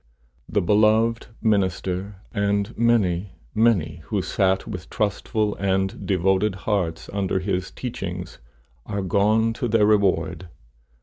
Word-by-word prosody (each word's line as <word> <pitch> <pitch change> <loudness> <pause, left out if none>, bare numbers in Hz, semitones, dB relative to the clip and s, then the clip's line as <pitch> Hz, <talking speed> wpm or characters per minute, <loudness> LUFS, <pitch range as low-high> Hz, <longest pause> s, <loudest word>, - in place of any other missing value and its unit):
The - - +1
beloved 110 +4 +3 0.2
minister, 95 -2 0 0.2
and 100 +1 0
many, 100 -6 +1 0.2
many 100 -9 +2
who 100 -4 -1
sat 95 -1 +1
with 90 -6 -7
trustful 105 0 -1
and 95 -1 -1
devoted 95 +2 +2
hearts 90 -7 -1
under 95 -2 0
his 95 -1 -2
teachings, 90 -7 -6 0.5
are 100 -1 -2
gone 105 +4 +2
to 120 +1 -2
their 110 -2 +3
reward. 100 -3 +1
100 Hz, 115 wpm, -23 LUFS, 95-110 Hz, 0.5 s, beloved